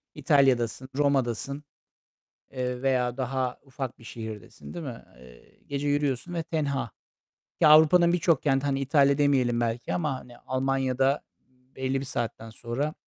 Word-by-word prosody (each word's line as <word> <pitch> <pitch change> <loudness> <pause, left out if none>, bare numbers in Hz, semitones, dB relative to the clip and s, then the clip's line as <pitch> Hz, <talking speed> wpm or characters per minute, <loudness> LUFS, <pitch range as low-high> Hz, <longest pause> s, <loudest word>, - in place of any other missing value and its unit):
İtalya'dasın, 135 -4 +2
Roma'dasın, 140 -1 0 0.9
eee, 125 -1 -3
veya 125 -2 +1
daha 130 -1 -2
ufak 135 -2 -6
bir 115 - -16
şehirdesin, 110 - -9
değil 170 -3 -5
mi? 120 -4 -7
Eee, 60 -1 -18
gece 140 +1 -2
yürüyorsun 145 +3 -1
ve 165 - -1
tenha 140 -7 -2 0.7
ki - - +6
Avrupa'nın 160 +3 +7
birçok 165 -4 +2
kenti, 135 -1 +1
hani 135 -1 0
İtalya 140 0 +3
demeyelim 130 -5 +2
belki 115 0 -2
ama, 150 -5 -1
hani 120 -1 -14
Almanya'da 135 0 0 0.5
belli 130 0 -1
bir 135 - -5
saatten 115 -3 -4
sonra 125 +7 -3
135 Hz, 140 wpm, -27 LUFS, 125-145 Hz, 0.9 s, Avrupa'nın